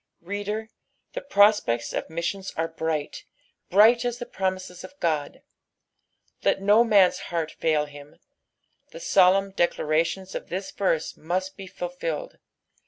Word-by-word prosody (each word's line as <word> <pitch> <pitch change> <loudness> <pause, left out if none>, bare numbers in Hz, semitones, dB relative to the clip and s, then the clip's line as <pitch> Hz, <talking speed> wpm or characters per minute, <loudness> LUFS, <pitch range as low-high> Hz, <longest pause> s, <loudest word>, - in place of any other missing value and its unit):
Reader, 205 +4 -4 0.4
the - - -4
prospects 200 - +3
of - - -3
missions 180 +4 -3
are 165 0 0
bright, 160 -2 -3 0.5
bri)^ht 225 +5 +6
as 245 -1 -2
the 240 - -6
promises 185 -4 -4
of - - -11
Ood. 155 -4 -1 1.0
Let - - +2
no 205 +4 +5
man's 200 -5 +4
heart 165 -3 -2
fail 155 -2 0
him; 145 0 -13 0.7
the - - -10
solemn 195 - +4
declarations 175 +1 0
of - - -6
this 190 +2 -4
verse 175 -5 -1
must 185 +4 -3
be 195 -1 -9
fulfilled. 175 -4 -5
185 Hz, 130 wpm, -25 LUFS, 160-200 Hz, 1.0 s, bri)^ht